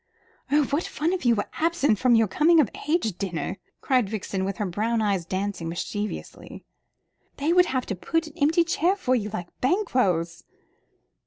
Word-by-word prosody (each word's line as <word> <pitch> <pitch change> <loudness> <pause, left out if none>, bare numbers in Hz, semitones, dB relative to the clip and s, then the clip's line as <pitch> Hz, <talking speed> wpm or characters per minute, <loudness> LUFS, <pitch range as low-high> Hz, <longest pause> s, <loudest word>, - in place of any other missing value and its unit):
"Oh, 295 +1 +4
what 290 +4 +1
fun 325 +4 -1
if 360 -9 -1
you 235 - +5
were 205 - -1
absent 310 - +1
at 250 -2 +5
your 225 -1 +4
coming 320 - +4
of 270 -9 +3 0.2
age 225 - 0
dinner!" 185 -1 -3 0.2
cried 250 -7 +1
Vixen, 195 -2 -3
with 195 0 -3
her 210 - -1
brown 220 +6 -1
eyes 200 -5 0
dancing 190 -3 -3
mischievously. 205 +5 -6 0.7
"They 300 +4 +1
would 360 0 +5
have 255 -1 -1
to 200 - -3
put 330 - -1
an 310 - -11
empty 320 +4 +4
chair 335 +3 +1
for 255 -10 0
you, 215 -4 0
like 180 -5 -5
Banquo's." 250 - +1
230 Hz, 175 wpm, -25 LUFS, 195-310 Hz, 0.7 s, you